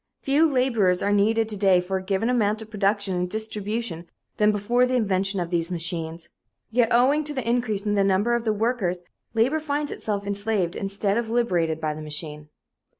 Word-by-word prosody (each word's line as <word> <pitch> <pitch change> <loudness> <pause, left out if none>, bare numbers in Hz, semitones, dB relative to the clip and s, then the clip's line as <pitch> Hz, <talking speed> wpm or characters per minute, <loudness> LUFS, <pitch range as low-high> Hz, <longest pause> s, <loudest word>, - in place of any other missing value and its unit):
Fewer 295 +3 +3
laborers 230 -9 +2
are 200 - +1
needed 220 +2 +2
to 215 - -3
day 195 -2 +4
for 185 +2 -2
a - - -4
given 195 +3 0
amount 220 -3 +1
of 220 - -16
production 200 -2 +1
and 180 0 -1
distribution 215 -4 -4 0.3
than 210 0 +4
before 235 +5 +2
the 255 - 0
invention 195 -4 +1
of 175 -1 -3
these 170 0 0
machines. 165 -1 -4 0.4
Yet, 235 0 +3
owing 270 +6 +4
to 295 0 -4
the 255 -4 -3
increase 225 -4 0
in 210 - +1
the 200 -1 +3
number 195 +4 +2
of 235 -1 0
the 220 - +1
workers, 210 -5 -1 0.3
labor 255 +8 +2
finds 295 -1 -2
itself 205 -2 -3
enslaved 200 -3 -1
instead 200 +1 -1
of 230 -2 -4
liberated 175 -9 +1
by 155 -1 -1
the 155 - -8
machine. 150 0 -5
205 Hz, 195 wpm, -24 LUFS, 185-235 Hz, 0.4 s, day